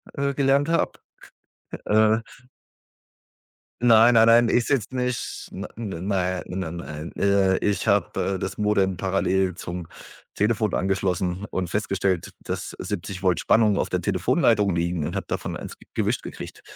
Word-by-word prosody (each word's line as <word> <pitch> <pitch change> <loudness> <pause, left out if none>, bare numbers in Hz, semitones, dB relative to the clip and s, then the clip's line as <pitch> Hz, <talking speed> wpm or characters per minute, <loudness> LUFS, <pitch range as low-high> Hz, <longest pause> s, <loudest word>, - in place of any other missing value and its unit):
äh, 140 0 0
gelernt 140 +2 +2
habe, 165 - +1 0.9
äh. 110 +1 +4 1.6
Nein, 115 0 +6
nein, 110 - +7
nein, 115 +1 +5
ich 120 - +2
sitze 130 -2 -1
nicht, 125 -1 -3
ne 100 +2 -6
n 95 -5 -5
nei 95 -2 0
n 95 +1 -3
n 85 0 -6
nein. 75 -1 -7
Äh, 100 -1 +3
ich 105 +1 -1
habe, 100 -3 +1 0.2
äh, - - -4
das 95 +1 -4
Modem 100 -3 +1
parallel 95 -1 +1
zum 85 -1 -6 0.5
Telefon 110 0 0
angeschlossen 95 0 -1
und 90 -2 -2
festgestellt, 95 -2 -1
dass - - -5
70 95 -1 -5
Volt 90 -3 +2
Spannung 110 -3 +3
auf - - -1
der - - -1
Telefonleitung 105 -5 +2
liegen, 85 -2 -1
und - - -4
habe - - -4
davon - - -3
1 - - -8 0.2
gewischt - - -1
gekriegt. - - -9
100 Hz, 150 wpm, -24 LUFS, 90-110 Hz, 1.6 s, nein